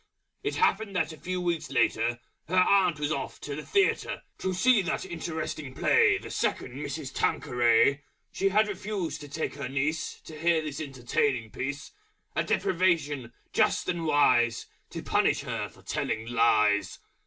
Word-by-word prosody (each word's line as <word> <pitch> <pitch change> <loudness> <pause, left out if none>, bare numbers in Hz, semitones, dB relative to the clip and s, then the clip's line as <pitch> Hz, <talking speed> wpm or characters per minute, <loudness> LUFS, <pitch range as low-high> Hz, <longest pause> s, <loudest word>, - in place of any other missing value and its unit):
It - - -2
happened 215 -3 +1
that 165 -3 0
a - - -11
few 185 0 -3
Weeks 170 -3 -2
later 120 -2 +1 0.3
Her 180 - -2
Aunt 185 -4 +4
was 150 0 -1
off 140 -3 -3
to 145 - -5
the 150 - -6
Theatre 400 0 +1 0.2
To 190 - -1
see 215 +5 +4
that 175 0 -2
Interesting 160 -5 -5
Play 440 -3 +4
The - - -9
Second - - -1
Mrs. 140 0 -5
Tanqueray. 120 +3 +2 0.3
She 195 - +1
had 215 +2 +3
refused 190 -6 -4
to 145 - -9
take 155 +3 -3
her 140 -3 -5
Niece 145 +4 -2
To 155 - -11
hear 165 -1 +2
this 150 -1 -5
Entertaining 130 -3 -1
Piece: 140 +1 -5 0.4
A - - +1
Deprivation 165 -9 0 0.2
Just - - +2
and 170 -2 -1
Wise 120 -6 +3 0.2
To - - -7
Punish - - +2
her - - -4
for - - -20
Telling 110 - -2
Lies. 105 -4 +2
155 Hz, 160 wpm, -28 LUFS, 130-180 Hz, 0.4 s, Aunt